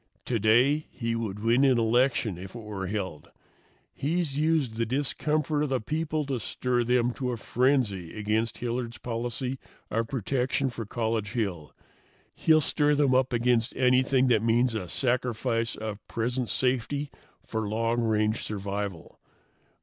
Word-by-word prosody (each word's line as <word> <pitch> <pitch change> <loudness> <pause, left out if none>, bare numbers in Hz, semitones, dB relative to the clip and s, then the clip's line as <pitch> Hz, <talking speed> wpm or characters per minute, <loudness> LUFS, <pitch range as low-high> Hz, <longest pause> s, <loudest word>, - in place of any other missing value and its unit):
Today 125 +6 +3
he 115 -2 -3
would 105 -3 -4
win 120 +4 +4
an 130 -3 +5
election 120 -2 +2
if 95 +5 -9
it 115 - -7
were 100 -3 -5
held. 95 -6 -4 0.6
He's 155 0 -1
used 150 -5 +1
the 115 - +1
discomfort 150 +3 0
of 150 - 0
the 130 -1 +1
people 155 +4 -2
to 135 -3 -2
stir 120 +2 0
them 120 0 +2
to 125 0 -3
a 120 - -3
frenzy 110 - 0
against 110 +2 0
Hilliard's 120 -1 -3
policy 120 +3 -3 0.3
of 115 +1 0
protection 130 +2 0
for 115 -3 -6
College 110 -3 -2
Hill. 95 -10 -2 0.6
He'll 155 -1 +4
stir 150 0 +2
them 140 -2 +3
up 130 +1 +3
against 120 0 +1
anything 130 +1 +3
that 115 -4 +4
means 115 +2 +2
a 100 -5 -3
sacrifice 120 -1 0
of 110 -1 -5
present 120 +1 -1
safety 130 +5 0 0.3
for 110 -2 -3
long 115 +2 0
range 110 -1 +1
survival. 100 -3 -5
120 Hz, 145 wpm, -27 LUFS, 110-130 Hz, 0.6 s, an